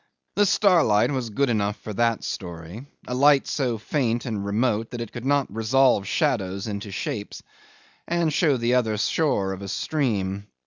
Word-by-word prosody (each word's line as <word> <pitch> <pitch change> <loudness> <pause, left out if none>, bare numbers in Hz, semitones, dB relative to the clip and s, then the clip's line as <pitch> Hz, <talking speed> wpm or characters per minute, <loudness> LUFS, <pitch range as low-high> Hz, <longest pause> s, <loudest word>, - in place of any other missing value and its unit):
The 205 0 +4
starlight 170 - +4
was 130 -4 -2
good 135 +4 0
enough 105 -2 0
for 110 - -8
that 115 +1 +1
story, 85 - -7 0.2
a 125 - -3
light 140 +2 +4
so 130 -5 -1
faint 120 +1 -1
and 110 -5 -3
remote 110 +2 0
that 120 - -6
it 115 - -6
cannot 135 -1 -1
resolve 115 -1 +3
shadows 100 -9 0
into 105 -1 -5
shapes, 105 +2 -5 0.6
and 170 -2 0
show 145 -4 +3
the 120 +1 +1
other 110 -4 +1
shore 105 -5 0
of 95 - -8
a 100 - -6
stream. 100 -6 -2
115 Hz, 165 wpm, -24 LUFS, 100-135 Hz, 0.6 s, The